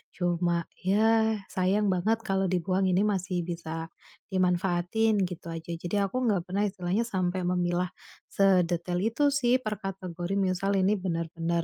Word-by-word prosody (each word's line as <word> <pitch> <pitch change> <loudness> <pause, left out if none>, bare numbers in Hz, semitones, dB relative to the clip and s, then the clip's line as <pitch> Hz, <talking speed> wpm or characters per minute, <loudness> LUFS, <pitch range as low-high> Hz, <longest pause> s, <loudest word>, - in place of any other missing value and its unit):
cuma, 175 -1 0 0.2
"Ya 220 +3 +3 0.2
sayang 195 +3 +2
banget 215 +5 +1
kalau 195 -1 +1
dibuang, 185 +1 +1
ini 180 - +3
masih 185 -4 -1
bisa 165 -1 -5 0.4
dimanfaatin." 185 +3 +1
Gitu 180 -2 -5
aja. 165 0 -6
Jadi 170 +3 -4
aku 200 +6 -1
enggak 205 -7 +1
pernah 195 +3 0
istilahnya 190 +2 -1
sampai 185 -3 -1
memilah 180 0 0 0.4
sedetail 180 -2 +2
itu 285 +6 +2
sih 255 -3 +3
per 215 -2 -3
kategori. 185 -1 -4
Misal 195 0 +1
ini 195 +2 +2
benar-benar, 170 -1 -2
185 Hz, 140 wpm, -28 LUFS, 175-200 Hz, 0.4 s, Ya